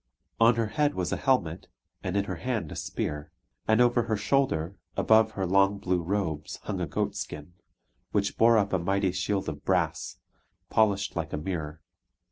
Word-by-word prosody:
On 115 +1 +6
her 115 -1 +1
head 145 +6 0
was 90 -2 -2
a - - +1
helmet, 95 - 0 0.3
and 90 +2 -2
in 100 - +2
her 95 -3 -5
hand 110 -6 -3
a - - -6
spear. 75 0 -4 0.4
And 110 +1 +4
over 120 -1 +4
her 110 -2 0
shoulder, 105 - 0 0.2
above 110 0 +4
her 95 -2 -2
long 100 +2 +3
blue 90 -3 0
robes, 85 -4 -2
hung - - -3
a - - -1
goat - - -2
skin, 75 +4 -6 0.6
which 100 -1 0
bore 115 0 +5
up 100 -2 +1
a 95 - +3
mighty 95 +2 +1
shield 95 +2 -1
of 75 -2 -5
brass, 90 -4 0 0.5
polished 105 -3 +2
like 80 -2 -3
a - - 0
mirror. 80 -1 -4
95 Hz, 180 wpm, -28 LUFS, 85-110 Hz, 0.6 s, On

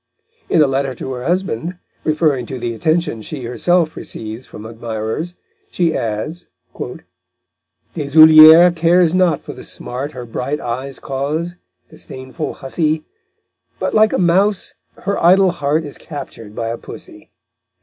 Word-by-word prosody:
In 160 - +5
a - - +4
letter 135 -1 -1
to 130 - -5
her 125 -1 -6
husband, 180 -2 -2 0.3
referring 150 -6 +1
to 130 - -5
the 120 -1 -3
attentions 155 -2 -1
she 145 -5 -6
herself 160 +7 +1
receives 110 +3 -8
from 105 - -10
admirers, 115 +8 -5 0.3
she 170 -3 0
adds: 115 +11 -4 1.5
_Deshoulières 155 +3 +8
cares 170 +1 +3
not 180 -5 +2
for - - -8
the - - -11
smart 135 +5 -6
Her 125 -1 -7
bright 125 +5 -3
eyes 130 +3 -5
cause, 150 +6 -3 0.4
disdainful 130 0 -7
hussy, 155 +3 -1 0.7
But, - - -2
like 215 0 +4
a - - 0
mouse, 185 +3 +2 0.3
her 200 -1 -1
idle 185 +2 +5
heart 155 -1 -1
Is 145 -2 -9
captured 115 -8 -9
by 115 -1 -3
a 115 - -4
pussy_. - - -12
150 Hz, 140 wpm, -18 LUFS, 125-170 Hz, 1.5 s, Deshoulières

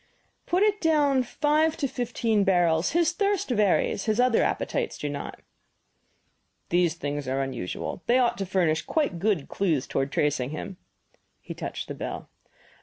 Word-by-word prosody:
"Put 365 +3 +2
it 420 -1 +2
down 290 -5 +3
five 300 +5 +1
to 280 - 0
fifteen 235 -4 0
barrels 175 - +2
his 340 0 +3
thirst 400 -4 0
varies; 205 -3 +2
his 220 +1 0
other 250 -2 +4
appetites 475 -3 -1
do 150 - -4
not." 145 0 -6 1.3
"These 175 -1 +2
things 145 -3 -4
are 135 +1 -1
unusual. 130 - -5
They 245 - +4
ought 245 -4 +2
to 195 - -2
furnish 170 -4 +1
quite 290 - -1
good 190 -6 0
clues 165 -9 0
toward 135 +1 -2
tracing 140 -4 0
him." 180 +5 -6 0.6
He - - -8
touched - - -6
the - - -5
bell. - - -6
205 Hz, 155 wpm, -26 LUFS, -, 1.3 s, other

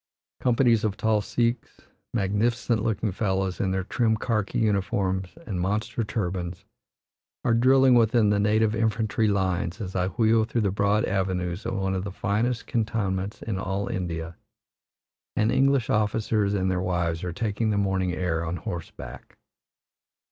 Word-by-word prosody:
Companies 120 -2 +3
of 110 -1 -1
tall 110 -1 +2
Sikhs, 120 +2 -2 0.3
magnificent 115 +2 0
looking 110 -2 0
fellows, 95 -1 -1
in 95 - +1
their 95 0 -1
trim 110 +2 +1
karki 110 -2 -1
uniforms 95 -3 0
and 95 -5 -3
monster 105 +5 -1
turbans, 90 -4 -3 0.8
are 115 - +3
drilling 130 +2 +5
within 115 -2 +4
the 105 - +2
native 105 +1 +2
infantry 110 0 +1
lines 95 -4 0
as 95 -4 -6
I 90 -1 +1
wheel 110 +2 +3
through 115 +1 -1
the 100 -3 +1
broad 100 +2 +2
avenues 95 -1 -2
of - - -2
one 95 0 -1
of 95 -1 -2
the 100 - -5
finest 110 +5 -1
cantonments 105 -4 -2
in 105 -4 -3
all 95 +1 -2
India, 85 -2 -4 1.0
and 110 - +2
English 135 -3 +3
officers 105 -1 +1
and 95 -1 +1
their 90 -1 0
wives 85 -2 -1
are 90 - -2
taking 110 +3 -1
the 105 - +1
morning 95 -2 +1
air 90 -2 -1
on 85 +1 -3
horseback. 85 -1 -8
100 Hz, 150 wpm, -26 LUFS, 95-110 Hz, 1.0 s, drilling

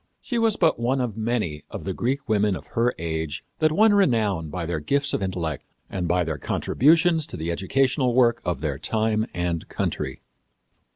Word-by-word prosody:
She 240 -3 -2
was 225 -2 +3
but 160 -8 +3
one 125 +3 +1
of 120 -5 -2
many 110 - -2
of - - -7
the 95 - -3
Greek 135 +7 -2
women 105 -2 +2
of - - -8
her 120 +1 +2
age 80 -3 -3 0.2
that 155 -1 +3
won 215 +6 +5
renown 110 - +2
by 85 +1 -4
their 85 -1 -2
gifts 140 - 0
of - - 0
intellect 85 -6 -3 0.3
and 90 -2 -2
by 90 +1 +2
their 80 -3 -3
contributions 160 - +3
to - - -8
the 80 +2 -2
educational 125 - +1
work 120 -2 +4
of 85 -7 -2
their 70 -3 -2
time 110 0 0
and 85 -2 -3
country. 65 0 -3
110 Hz, 185 wpm, -24 LUFS, 85-135 Hz, 0.3 s, won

